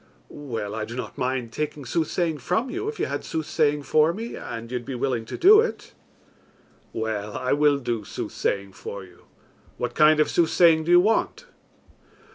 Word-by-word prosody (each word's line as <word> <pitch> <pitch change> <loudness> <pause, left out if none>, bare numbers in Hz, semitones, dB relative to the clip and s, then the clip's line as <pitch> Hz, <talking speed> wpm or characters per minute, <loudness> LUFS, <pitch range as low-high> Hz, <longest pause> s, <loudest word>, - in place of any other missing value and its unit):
"Well, 115 -8 -5
I 110 0 -3
do 115 +2 -7
not 125 - -6
mind 130 -3 -2
taking 150 0 -4
soothsaying 160 +3 -1
from 185 - -1
you, 400 +4 -3
if 445 - -8
you - - +1
had - - -4
soothsaying 150 -2 0
for 155 +3 +3
me, 230 +5 -6
and 115 +1 -7
you 125 - -1
would - - -13
be 135 - -5
willing 125 -2 -1
to - - -6
do 420 +4 +7
it." 470 - -5 1.0
"Well, 110 -2 -3
I 130 0 0
will 145 0 +3
do 120 -5 -3
soothsaying 100 0 -3
for 100 +1 -8
you. 90 -2 -18 0.5
What 120 0 -3
kind 155 +1 +5
of 155 - +4
soothsaying 165 -1 +3
do 170 - 0
you 175 0 +8
want?" 225 - 0
145 Hz, 180 wpm, -24 LUFS, 115-165 Hz, 1.0 s, you